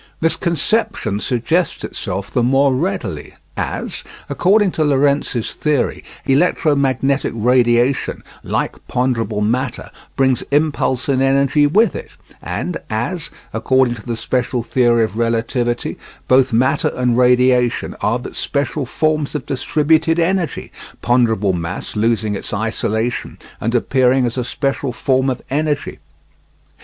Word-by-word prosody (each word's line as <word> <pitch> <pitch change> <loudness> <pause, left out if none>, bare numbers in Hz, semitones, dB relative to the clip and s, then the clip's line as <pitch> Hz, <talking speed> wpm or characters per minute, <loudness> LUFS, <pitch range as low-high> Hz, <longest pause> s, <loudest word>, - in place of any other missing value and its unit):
This 165 0 +2
conception 170 - 0
suggests 140 +10 -1
itself 95 -1 -4
the 125 - +1
more 135 +3 +3
readily 125 - -3 0.2
as, - - -4 0.3
according 200 +1 +3
to 160 - 0
Lorentz's 140 -4 +1
theory, 150 -4 -1 0.2
electromagnetic 140 -3 +2
radiation, 120 +2 +2 0.2
like - - -3
ponderable 115 -4 -1
matter, 125 +4 -1 0.2
brings 130 -2 +2
impulse 140 -3 +1
and 135 -2 +1
energy 140 +2 +3
with 215 +10 +3
it, - - -7 0.3
and 180 - -3
as, 135 +10 -3 0.2
according 125 +2 +2
to 110 -3 -10
the 115 -1 -2
special 125 0 -1
theory 120 -1 +2
of 110 0 -3
relativity, 120 +1 -1 0.3
both 130 0 +4
matter 120 +3 +2
and 125 -2 +1
radiation 125 0 +3
are - - +1
but - - -9
special 140 -1 -2
forms 155 +1 0
of 145 - -3
distributed 160 +4 +1
energy, 175 0 -1 0.3
ponderable 115 -5 +2
mass 85 +1 -4
losing 110 -1 +1
its 100 - -5
isolation 110 +2 -2 0.2
and 115 +3 -1
appearing 130 +1 +3
as 115 - -2
a 125 - -1
special 135 +1 -2
form 130 +1 +1
of 130 - -4
energy. 150 +1 -1
130 Hz, 125 wpm, -18 LUFS, 115-145 Hz, 0.3 s, both